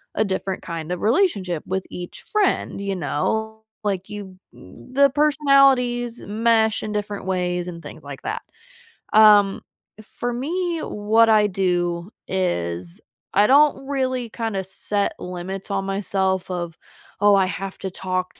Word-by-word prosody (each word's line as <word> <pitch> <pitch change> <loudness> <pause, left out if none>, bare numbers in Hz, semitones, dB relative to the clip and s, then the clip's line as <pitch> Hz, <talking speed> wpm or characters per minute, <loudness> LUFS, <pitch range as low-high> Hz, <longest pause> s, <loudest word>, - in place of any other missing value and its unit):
a 215 - +2
different 190 -1 -3
kind 165 0 -5
of 180 - -3
relationship 210 - +1
with 190 0 -2
each 175 0 -8
friend, 425 - 0
you 200 -1 -2
know? 220 +8 -2 0.2
Like, 195 -2 -2
you 200 -3 -8 0.2
the 260 - 0
personalities 275 -5 +3
mesh 220 +1 +2
in 215 - -4
different 205 -1 -3
ways 180 -1 -1
and 170 -2 -7
things - - -10
like - - -8
that. - - -3 0.7
Um, 210 -2 +6 0.4
for 240 +3 -4
me, 335 +7 -2
what 220 +2 +2
I 215 -1 +5
do 175 -1 -1 0.2
is 85 - -2 0.3
I 205 +2 +5
don't 275 0 +4
really 260 -3 -1
kinda 220 -4 -3
set 200 +2 -2
limits 180 +2 -6
on 195 -1 -1
myself 190 -1 -1
of, 175 -2 -4 0.4
"Oh, 205 0 +6
I 195 -1 +4
have 195 +1 -5
to 190 - -4
talk 185 0 -3
200 Hz, 140 wpm, -22 LUFS, 185-230 Hz, 0.7 s, Um